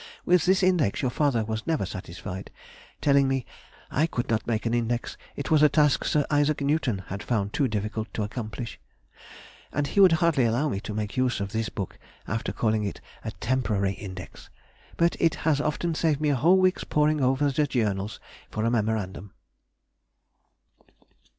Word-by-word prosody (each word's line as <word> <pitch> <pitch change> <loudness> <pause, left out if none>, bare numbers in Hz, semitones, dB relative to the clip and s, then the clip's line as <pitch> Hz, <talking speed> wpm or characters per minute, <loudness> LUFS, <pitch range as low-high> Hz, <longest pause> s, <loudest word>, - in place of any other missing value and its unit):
With 180 -2 +4
this 190 +1 +4
Index 165 - +2
your 125 - +1
father 135 -5 +1
was 110 0 -4
never 160 -11 +1
satisfied, 95 0 -7 0.5
telling 140 -1 +4
me, 135 -2 -1 0.5
"I 155 +4 +2
could 120 -7 -3
not 110 - 0
make 115 -1 -1
an 115 - 0
Index, 120 0 -1 0.2
it 140 - -5
was 155 -2 +5
a 150 - +7
task 150 -2 +3
Sir 150 -2 +2
I. 145 -1 +3 0.2
Newton 140 -9 0
had 100 +2 -4
found 105 -4 -1
too 140 - +2
difficult 110 0 -3
to 110 - -1
accomplish,"... 110 +2 -5 0.9
and 145 +1 0
he 170 - -1
would 190 -4 +8
hardly 160 -5 +3
allow 120 +7 +1
me 100 - -2
to 105 0 -6
make 105 +3 -3
use 130 -3 +1
of 100 -1 -3
this 110 0 -1
book, 100 -4 -6 0.3
after 110 +2 -2
calling 110 -2 0
it 100 - -4 0.2
a - - -3
temporary 105 -6 0
Index. 95 -2 -9 0.5
But 170 0 +3
it 165 -2 +3
has 150 -3 +3
often 150 +3 -1
saved 155 -2 +1
me 150 -1 +1
a 145 - +3
whole 170 +9 +5
week's 185 0 +2
poring 150 0 +2
over 135 +2 +2
the 145 +2 +1
Journals 105 -5 -1 0.3
for 110 +1 -2
a 115 - +2
memorandum.... 105 -4 -2
125 Hz, 175 wpm, -26 LUFS, 110-150 Hz, 0.9 s, would